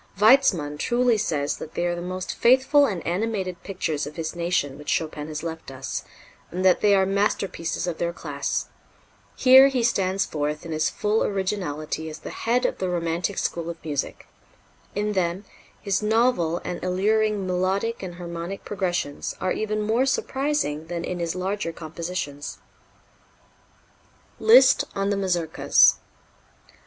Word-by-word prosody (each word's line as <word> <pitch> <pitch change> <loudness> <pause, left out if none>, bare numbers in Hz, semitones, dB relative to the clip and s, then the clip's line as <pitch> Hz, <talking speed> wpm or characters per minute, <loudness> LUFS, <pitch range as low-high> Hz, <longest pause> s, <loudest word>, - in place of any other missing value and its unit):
Weitzmann 200 - +4
truly 240 +3 +2
says 150 -8 -1
that 155 - -9
they 175 - 0
are 175 - 0
the 175 - -5
most 185 +1 -4
faithful 265 +4 +5
and 185 -8 -4
animated 185 -1 -2
pictures 165 -7 -3
of 150 - -9
his 160 +1 -4
nation 170 -5 -1
which 150 - -7
Chopin 155 -2 -1
has 155 0 -5
left 165 -2 -6
us, 135 0 -5 0.5
and 185 +2 -3
that 185 - +5
they 205 -1 +5
are 190 -1 +3
masterpieces 195 -4 -1
of 175 -2 -4
their 170 0 0
class: 145 -4 -3 0.7
"Here 265 +1 +8
he 260 -3 0
stands 195 -4 +1
forth 150 +1 -3
in 165 - -6
his 155 0 +1
full 210 +1 0
originality 175 -6 -2
as 155 - -8
the - - -8
head 240 +2 0
of - - -1
the 185 - -1
romantic 175 +2 -1
school 170 -1 -2
of 170 - -5
music; 145 -3 -3 0.7
in 210 +1 -1
them 185 +1 -1 0.3
his 200 -1 -1
novel 215 -6 +2
and 175 -1 -4
alluring 205 +2 +1
melodic 190 +5 -1
and 180 -2 -6
harmonic 175 +2 -6
progressions 175 -7 -2
are 185 - -1
even 215 0 -1
more 230 +5 +2
surprising 270 - -1
than 170 0 -4
in 180 0 -4
his 170 0 -2
larger 190 -1 -2
compositions." 160 -3 -5 1.8
Liszt 475 +3 +6
on 195 +1 0
the - - +1
Mazurkas. 175 -5 +3
180 Hz, 150 wpm, -24 LUFS, 165-210 Hz, 1.8 s, Here